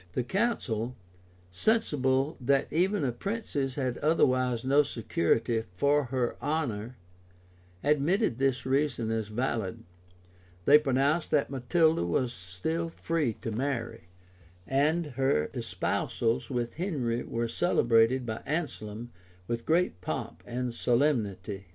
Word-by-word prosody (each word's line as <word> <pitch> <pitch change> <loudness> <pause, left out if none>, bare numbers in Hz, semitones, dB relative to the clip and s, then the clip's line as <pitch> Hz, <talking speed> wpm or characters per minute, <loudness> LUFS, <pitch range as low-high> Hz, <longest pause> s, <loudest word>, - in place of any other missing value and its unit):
The 125 - 0
council, 125 - -1 0.6
sensible 135 - +1
that 135 +2 +1
even 185 +3 +2
a 130 - +1
princess 140 - -3
had 130 -4 -2
otherwise 130 -6 +2
no 140 +2 +5
security 115 - 0
for 145 +6 +3
her 125 -1 -1
honor, 125 -6 -2 0.9
admitted 150 - +2
this 135 -2 +1
reason 130 -4 0
as 110 -2 -1
valid: 110 -3 -2 0.8
they 150 +2 +8
pronounced 140 +3 +1
that 145 -2 +1
Matilda 155 - +2
was 120 +8 0
still 95 - -3
free 165 -6 -1
to 115 - -2
marry;[] 120 -6 -3 0.6
and 150 - +2 0.2
her 75 - +2
espousals 115 +1 -1
with 120 -2 -2
Henry 135 -10 -1
were 115 0 -2
celebrated 120 -3 +3
by 110 -1 -4
Anselm 120 -8 -4 0.4
with 115 0 -3
great 165 - +2
pomp 80 -3 -4
and 125 0 -3
solemnity. 110 -7 0
130 Hz, 115 wpm, -29 LUFS, 115-150 Hz, 0.9 s, they